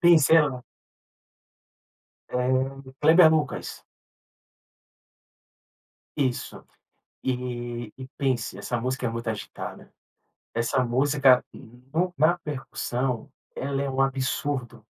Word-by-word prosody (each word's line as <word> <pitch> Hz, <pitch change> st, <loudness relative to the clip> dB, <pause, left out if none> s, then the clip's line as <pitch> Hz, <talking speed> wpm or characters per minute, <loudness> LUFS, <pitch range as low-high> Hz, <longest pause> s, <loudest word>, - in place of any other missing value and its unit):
pensa, 165 Hz, -4 st, +6 dB
era 150 Hz, -2 st, +6 dB
no 125 Hz, -1 st, -7 dB, 1.7 s
Eh, 130 Hz, +1 st, -1 dB
Kleber 160 Hz, +2 st, +7 dB
Lucas. 155 Hz, -1 st, -1 dB, 2.3 s
Isso. 130 Hz, -4 st, -2 dB, 0.6 s
E 120 Hz, -3 st, -3 dB
e 130 Hz, -1 st, -8 dB
pense, 125 Hz, -8 st, -1 dB
essa 120 Hz, +4 st, -2 dB
música 130 Hz, 0 st, -2 dB
é -, -, +1 dB
muito 115 Hz, 0 st, -4 dB
agitada, 105 Hz, -, -7 dB, 0.6 s
essa 120 Hz, +2 st, +1 dB
música 135 Hz, +1 st, +4 dB
no 135 Hz, +9 st, -4 dB
na 170 Hz, +4 st, +4 dB
percussão, 130 Hz, -5 st, -3 dB, 0.3 s
ela 140 Hz, 0 st, -2 dB
é 140 Hz, -, -2 dB
um 130 Hz, -, -2 dB
absurdo. 130 Hz, -3 st, -1 dB
130 Hz, 95 wpm, -26 LUFS, 120-145 Hz, 2.3 s, Kleber